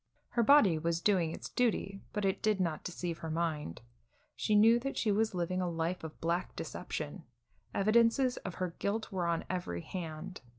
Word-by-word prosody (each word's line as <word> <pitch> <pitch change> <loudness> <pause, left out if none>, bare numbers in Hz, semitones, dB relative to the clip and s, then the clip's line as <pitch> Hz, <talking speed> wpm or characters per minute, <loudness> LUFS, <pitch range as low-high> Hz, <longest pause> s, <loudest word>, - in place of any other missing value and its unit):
Her 235 - +1
body 220 - +6
was 165 +1 0
doing 180 -3 +2
its - - -6
duty, 200 -5 0
but 210 -1 -1
it 190 - 0
did 215 -2 +2
not 170 -4 -1
deceive 175 -1 -4
her 160 - -5
mind. 155 - -2 0.5
She 215 - +1
knew 225 +3 +6
that 275 +3 -4
she 215 - +2
was 215 0 +1
living 180 +1 -1
a 180 - 0
life 170 +1 -2
of 160 -1 -8
black 170 +2 -1
deception; - - -5 0.5
evidences 230 +5 +3
of 185 - -6
her 185 -2 -3
guilt 220 +3 -1
were 180 -3 -1
on 170 -1 0
every 175 - -3
hand. 170 - -6
185 Hz, 180 wpm, -32 LUFS, 170-215 Hz, 0.5 s, body